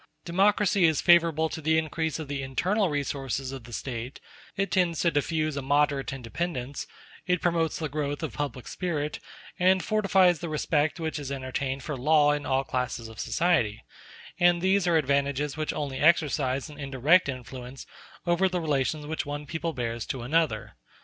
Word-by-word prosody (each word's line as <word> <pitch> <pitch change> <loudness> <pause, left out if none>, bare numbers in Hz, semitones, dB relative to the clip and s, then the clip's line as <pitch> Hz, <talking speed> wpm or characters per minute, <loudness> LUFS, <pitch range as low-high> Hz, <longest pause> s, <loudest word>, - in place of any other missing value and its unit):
Democracy 195 +1 +3
is 160 -2 +3
favorable 165 -2 +4
to 160 - -6
the 160 +1 +2
increase 160 0 -1
of 155 -2 -6
the 140 -1 -3
internal 185 +10 0
resources 135 -2 -2
of 135 -4 -8
the 120 - -12
State; 120 +1 -5 0.4
it 195 -2 -1
tends 175 -3 +2
to 170 - +3
diffuse 155 0 0
a 140 - -2
moderate 145 0 +1
independence; 135 +1 -4 0.4
it 180 -1 +2
promotes 165 -2 0
the 160 - -2
growth 145 -1 -3
of - - -3
public 140 -4 -4
spirit, 155 -5 -3 0.4
and 185 +1 +4
fortifies 190 -5 +3
the 170 - -5
respect 155 +1 0
which 160 -2 -3
is 140 -2 -6
entertained 135 0 -3
for 150 - -4
law 145 +3 +4
in 145 0 -2
all 135 0 +2
classes 125 -3 -3
of 110 -1 -12
society; 145 -12 +1 0.6
and 175 -1 +5
these 190 +1 +2
are 170 -2 +4
advantages 140 0 0
which 155 -1 -2
only 140 -3 -4
exercise 145 -5 +2
an 150 -1 -12
indirect 140 +5 +3
influence 130 0 -7 0.4
over 175 +2 +2
the 180 -1 -1
relations 150 -1 -1
which 155 0 -3
one 145 +1 -4
people 165 +2 -3
bears 120 -4 -3
to 130 -3 -4
another. 140 - 0
150 Hz, 170 wpm, -27 LUFS, 135-170 Hz, 0.6 s, and